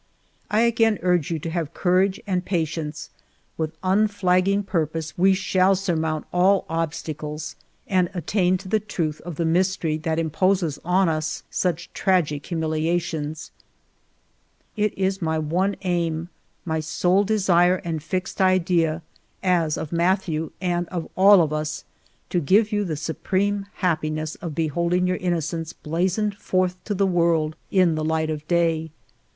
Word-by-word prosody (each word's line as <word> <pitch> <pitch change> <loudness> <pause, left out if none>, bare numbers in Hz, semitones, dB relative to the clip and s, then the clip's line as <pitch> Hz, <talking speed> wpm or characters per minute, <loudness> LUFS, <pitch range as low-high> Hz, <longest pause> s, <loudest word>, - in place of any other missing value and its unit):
I 215 +1 +3
again 225 -2 +3
urge 180 -5 +2
you 165 - -1
to 160 +2 -5
have 165 -2 -3
courage 185 +1 +2
and 185 -3 -1
pa 175 -4 0
tience; 155 -1 -6 0.5
with 160 -1 -3
unflagging 195 0 +2
purpose 160 -4 -2
we 190 +2 +4
shall 190 0 +3
sur 190 -2 -1
mount 160 -1 -1
all 185 +2 +3
obstacles 155 -2 -4 0.3
and 185 -2 +1
attain 180 +2 +1
to 190 +1 -11
the 215 +3 +2
truth 170 -7 -3
of 175 -1 -7
the 170 - -1
mystery 170 -2 +1
that 160 0 -2
imposes 165 0 +1
on 185 +2 +3
us 155 -1 -2
such 175 -2 -2
tragic 160 -7 +1
humilia 160 +1 0
tions. 155 -2 -5 1.2
It 210 -1 0
is 190 0 0
my 160 -1 0
one 175 +6 0
aim, 170 -2 -1 0.4
my 160 -2 -1
sole 180 +5 +2
desire 185 -4 +3
and 160 -2 -2
fixed 185 +5 -3
idea, 175 -3 +2 0.4
as 170 -5 +2
of 150 - -5
Mathieu, 170 -2 0
and 175 -2 -1
of 170 -3 -4
all 195 -1 +7
of 155 -1 -2
us, 155 0 -3 0.5
to 180 - +2
give 205 +8 +3
you 205 -1 +1
the 160 -4 -3
supreme 195 +6 -1
happiness 155 -3 -1
of 165 -5 -7
beholding 170 +3 +1
your 180 0 0
innocence 165 -2 -2
blazoned 185 +6 -1
forth 185 -2 -1
to 205 - -2
the 195 +1 +2
world 170 -4 +2
in 185 -4 +3
the 155 0 -2
light 160 0 0
of 155 0 -6
day. 165 -2 +1
175 Hz, 150 wpm, -23 LUFS, 160-190 Hz, 1.2 s, all